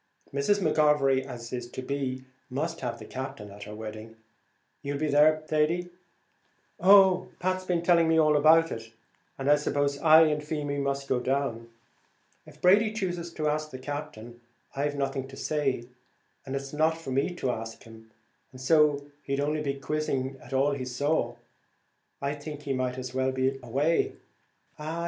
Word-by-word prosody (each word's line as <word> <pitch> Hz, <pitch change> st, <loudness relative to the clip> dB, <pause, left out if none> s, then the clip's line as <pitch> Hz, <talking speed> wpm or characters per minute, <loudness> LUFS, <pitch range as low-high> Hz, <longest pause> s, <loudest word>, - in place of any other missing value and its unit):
Mrs. 140 Hz, +9 st, +1 dB
McGovery, 150 Hz, -5 st, +3 dB
as 120 Hz, -2 st, -8 dB
is 120 Hz, -1 st, -4 dB
to 130 Hz, -, -7 dB
be, 130 Hz, -1 st, -3 dB, 0.3 s
must 160 Hz, +6 st, -3 dB
have 120 Hz, -2 st, -3 dB
the -, -, -10 dB
Captain 125 Hz, -6 st, -7 dB
at 100 Hz, +1 st, -10 dB
her 105 Hz, +1 st, -8 dB
wedding; 110 Hz, +1 st, -8 dB, 0.7 s
you'll 140 Hz, 0 st, -3 dB
be 150 Hz, 0 st, -1 dB
there, 155 Hz, +2 st, +5 dB
Thady?" 165 Hz, +4 st, 0 dB, 0.9 s
"Oh, 190 Hz, -1 st, +6 dB
Pat's 185 Hz, +1 st, -1 dB
been 175 Hz, -2 st, 0 dB
telling 170 Hz, -2 st, +4 dB
me 160 Hz, 0 st, +3 dB
about 155 Hz, +1 st, +5 dB
it, 115 Hz, 0 st, -7 dB, 0.5 s
and 135 Hz, -, -4 dB
I 145 Hz, 0 st, +6 dB
suppose 145 Hz, -1 st, 0 dB
I 160 Hz, +1 st, +7 dB
and 150 Hz, -1 st, +1 dB
Feemy 145 Hz, -2 st, -3 dB
must 140 Hz, 0 st, -2 dB
go 130 Hz, -, +1 dB
down. 125 Hz, -3 st, -2 dB, 0.8 s
If -, -, -15 dB
Brady 205 Hz, +4 st, +5 dB
chooses 175 Hz, -5 st, -3 dB
to 155 Hz, -2 st, -2 dB
ask 155 Hz, +1 st, -1 dB
the 130 Hz, -, -8 dB
Captain, 130 Hz, -4 st, -7 dB, 0.3 s
I've 145 Hz, +1 st, -1 dB
nothing 135 Hz, -1 st, -2 dB
to 135 Hz, 0 st, -12 dB
say; 135 Hz, -6 st, -1 dB, 0.6 s
it's 135 Hz, +1 st, -4 dB
not 160 Hz, +2 st, +2 dB
for 165 Hz, -5 st, -7 dB
me 135 Hz, +7 st, 0 dB
to 130 Hz, -7 st, -1 dB
ask 115 Hz, -1 st, -6 dB
him, 110 Hz, 0 st, -14 dB, 0.4 s
and, 130 Hz, -, -12 dB
as 130 Hz, +5 st, -4 dB, 0.5 s
he'd 140 Hz, -1 st, -2 dB
only 150 Hz, +2 st, 0 dB
be 140 Hz, -2 st, -2 dB
quizzing 135 Hz, -2 st, -2 dB
at -, -, -14 dB
all 135 Hz, +2 st, +2 dB
he 140 Hz, -2 st, -3 dB
saw, 145 Hz, +5 st, 0 dB, 0.9 s
I 140 Hz, +1 st, 0 dB
think 150 Hz, 0 st, -8 dB
he 140 Hz, -2 st, -2 dB
might 130 Hz, -1 st, -2 dB
as 125 Hz, -1 st, -6 dB
well 130 Hz, 0 st, +1 dB
be 130 Hz, +1 st, 0 dB
away." 140 Hz, +7 st, +1 dB, 0.7 s
"Ah! 155 Hz, +2 st, -4 dB
140 Hz, 170 wpm, -28 LUFS, 130-155 Hz, 0.9 s, I